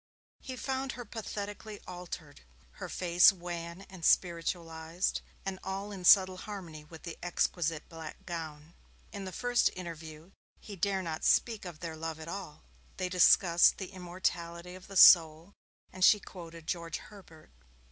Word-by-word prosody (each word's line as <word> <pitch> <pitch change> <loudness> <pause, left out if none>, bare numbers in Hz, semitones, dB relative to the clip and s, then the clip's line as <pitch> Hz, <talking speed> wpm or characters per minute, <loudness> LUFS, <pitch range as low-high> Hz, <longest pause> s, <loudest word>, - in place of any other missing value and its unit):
He 260 - -6
found 265 0 -3
her 245 0 -8
pathetically 205 -1 -6
altered 175 -4 -8 0.3
her - - -8
face 175 0 +5
wan 175 -1 -7
and 190 -3 -12
spiritualized, 165 0 0 0.2
and 190 -1 -4
all 195 +2 -4
in 190 -3 -7
subtle 185 -1 +7
harmony 180 -7 -8
with 160 +1 -13
the 170 - -7
exquisite 165 -2 -1
black 160 -2 -10
gown. 160 -2 -7 0.4
In 200 -2 -6
the 185 - -5
first 245 +4 +2
interview, 165 -1 -9 0.3
he 205 - -9
did 190 0 0
not 160 -2 -4
dare - - +1
speak 225 -5 +2
of 175 -3 -9
their 165 -2 -5
love 160 0 -5
at 160 - -9
all. 170 -4 -7 0.3
They 185 -1 -2
discussed 180 -1 +5
the 190 -1 -6
immortality 175 -1 -4
of 185 0 -12
the 195 -1 -5
soul, 165 +2 +7 0.4
and 185 - -3
she 210 - +7
quoted 170 -4 -11
George 170 -1 -3
Herbert. 175 -7 -15
175 Hz, 155 wpm, -31 LUFS, 165-195 Hz, 0.4 s, subtle